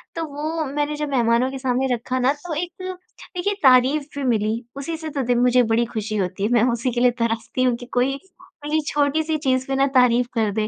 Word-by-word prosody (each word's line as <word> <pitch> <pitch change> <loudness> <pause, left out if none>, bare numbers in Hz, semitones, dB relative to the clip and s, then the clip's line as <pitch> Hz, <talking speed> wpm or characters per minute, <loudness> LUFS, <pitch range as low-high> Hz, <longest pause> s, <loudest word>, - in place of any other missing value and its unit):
तो 330 - -2
वो 310 +2 -2
मैंने 295 +2 -2
जब 295 0 -3
मेहमानों 240 -1 +2
के 270 - -5
सामने 260 0 0
रखा 255 +2 -2
ना 255 +2 +3
तो 315 +3 -7
एक 350 +3 -3
देखिए 370 +1 -5
तारीफ़ 265 +3 +5
भी 285 - -2
मिली, 215 -2 +1 0.2
उसी 280 +4 -4
से 315 0 -6
दे 245 0 +1
मुझे 250 +1 +4
बड़ी 225 +1 +1
खुशी 215 -1 -3
होती 185 0 -2
है। 210 - +1
मैं 235 -2 +4
उसी 240 +2 -1
के 240 0 -1
लिए 250 0 +5
तरसती 230 +2 -1
हूँ 250 -2 +2
कि 245 - -9
कोई 250 +2 +2 0.5
मेरी 310 +1 +1
छोटी-सी 310 +2 +1
चीज़ 260 -3 0
पे 270 - -1
ना 275 +1 +3
तारीफ़ 250 -1 +4
कर 220 -3 +1
दे। 215 0 -1
255 Hz, 220 wpm, -22 LUFS, 235-295 Hz, 0.5 s, तारीफ़